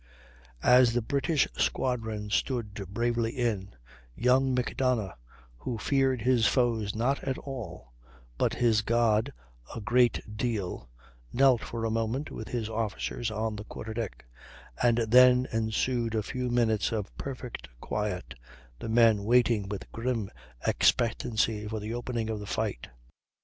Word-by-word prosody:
As 125 -1 +6
the 120 -2 -1
English 140 +1 +1
squadron 110 -5 -1
stood 115 -4 -1 0.2
bravely 115 +1 0
in, 110 - -2 0.4
young 130 +2 +3
Macdonough, 125 -5 0 0.4
who 115 - -4
feared 135 0 +1
his 120 -3 +4
foes 115 -5 +1
not 125 +5 0
at 135 -1 -2
all, 105 - -8 0.4
but - - 0
his 115 -3 +3
God 115 +2 +2 0.4
a - - -4
great 120 +1 +3 0.2
deal, 105 - -3 0.4
knelt 130 -2 +4
for 115 -1 -4
a 110 - 0
moment, 115 +6 -2
with 110 - -7
his 115 -3 -3
officers, 110 +1 -3
on 110 0 -2
the 105 - -6
quarter 110 0 -7
deck; 110 - -5 0.6
and 120 -1 +4
then 125 +2 +6
ensued 115 +1 0
a 110 - 0
few 125 +2 -3
minutes 115 -3 +1
of 105 -3 -4
perfect 125 - -6
quiet, 105 +1 -3 0.5
the - - -5
men 110 -3 +4
waiting 115 -3 +3
with 100 -1 -6
grim 115 -3 -2 0.3
expectancy 110 -2 +1
for 110 0 -3
the 105 +2 -5
opening 120 -2 -3
of 110 -1 -3
the 105 - -8
fight. 105 - -2
115 Hz, 140 wpm, -29 LUFS, 110-125 Hz, 0.6 s, As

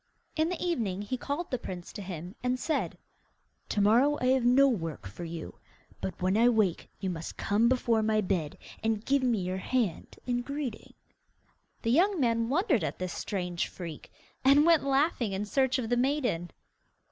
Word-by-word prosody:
In 315 +1 +2
the 360 - -3
evening 225 - -1
he 230 +5 -3
called 285 +7 -4
the 255 - -1
prince 180 -4 -7
and 195 +7 -4
said: 315 - -1 0.7
'To 205 - +1
morrow 245 +9 +4
I 250 - +1
have 260 -1 +3
no 255 +3 +6
work 165 - -2
for 95 - -8
you, 165 -1 -7 0.4
but 95 - -4
when 185 +2 +1
I 235 +2 +6
wake 215 -7 +1
you 190 -2 -2
must 165 -2 -6
come 215 +4 +2
before 235 -3 +2
my 215 0 +2
bed, 180 -7 -1 0.3
and 220 -1 0
give 280 0 +2
me 245 -3 +2
your 185 +1 -2
hand 220 -5 -2
in 245 -1 0
greeting.' 275 -3 -5 0.9
The 230 - +1
young 365 +7 +3
man 230 -3 +1
wondered 285 - +2
at - - -3
this 185 -1 -4
strange 180 -3 -2
freak, 170 -5 -8 0.3
and 280 +3 +6
went 335 -2 +5
laughing 270 - +1
in 195 +2 -2
search 265 +4 +2
of 245 -3 -2
the 245 +1 +1
maiden. 245 - 0
230 Hz, 175 wpm, -29 LUFS, 185-270 Hz, 0.9 s, no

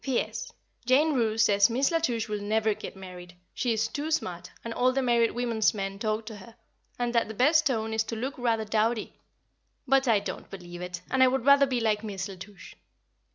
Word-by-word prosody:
P.S. 265 -3 -2 0.3
Jane 280 +6 +3
Roose 225 -4 +2
says 200 0 +4
Miss 260 +6 +1
La 330 - +2
Touche 235 -8 -1
will 210 -1 -3
never 215 +1 +1
get - - -9
married; 180 -2 -11 0.2
she 245 - -1
is 220 0 +1
too 290 +6 -4
smart, 180 - -2 0.2
and 230 - -4
all 255 +2 +2
the 270 +1 0
married 235 -2 +3
women's 230 -3 +1
men 195 -1 -4
talk 215 0 -2
to 220 -2 -8
her, 215 +3 -14 0.4
and 245 -1 -1
that 235 -3 +2
the 220 - -7
best 310 +7 +4
tone 225 -4 -1
is 220 0 +1
to 230 - -5
look 260 +5 -3
rather 230 -3 0
dowdy; 220 +1 0 0.7
but 270 0 +3
I 225 -3 +4
don't 200 - -7
believe 175 -2 -9
it, 180 -1 -6
and 260 - +2
I 260 - +8
would 260 -1 0
rather 280 0 +6
be 255 -2 -1
like 215 -2 0
Miss 200 -2 -4
La 195 - -8
Touche. 185 -1 -12
E. - - -30
225 Hz, 220 wpm, -27 LUFS, 205-255 Hz, 0.7 s, I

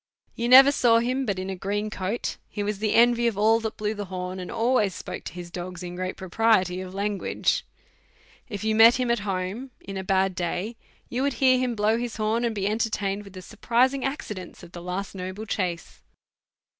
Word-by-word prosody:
You 235 +1 -2
never 270 +2 +9
saw 240 -5 +4
him 255 +3 0
but 200 -2 -1
in 185 +1 -4
a - - -4
green 205 +3 -3
coat; 200 +4 -3
he 205 - -4
was 205 -1 -2
the 215 -1 0
envy 235 0 +5
of 225 -4 -1
all 220 +2 +4
that 220 -1 -5
blew 210 0 -1
the 205 -1 -5
horn, 185 0 -5
and 180 - -6
always 225 -5 +1
spoke - - -7
to - - -6
his 175 -1 -8
dogs 180 0 -6
in 175 0 -6
great 185 +1 -4
propriety 190 -1 +1
of 185 0 -8
language. 200 0 0 0.9
If 205 -2 -5
you 220 0 +1
met 225 +2 +8
him 250 -1 0
at 235 - +1
home 190 +8 -3
in 195 0 -7
a 190 - -3
bad 190 0 +1
day, 180 +5 -3 0.3
you 245 - -2
would 280 0 +1
hear 255 -1 +4
him 250 -2 -1
blow 215 +2 +2
his 240 -1 -4
horn, 220 +2 0
and 230 -2 -1
be 195 -1 -2
entertained 210 -2 -1
with 200 - -13
the 185 -1 -9
surprising 245 +6 +1
accidents 210 - -5
of 175 - -12
the 175 - -9
last 180 +3 -4
noble 185 +3 -6
chace. 180 -5 -3
210 Hz, 210 wpm, -25 LUFS, 185-235 Hz, 0.9 s, never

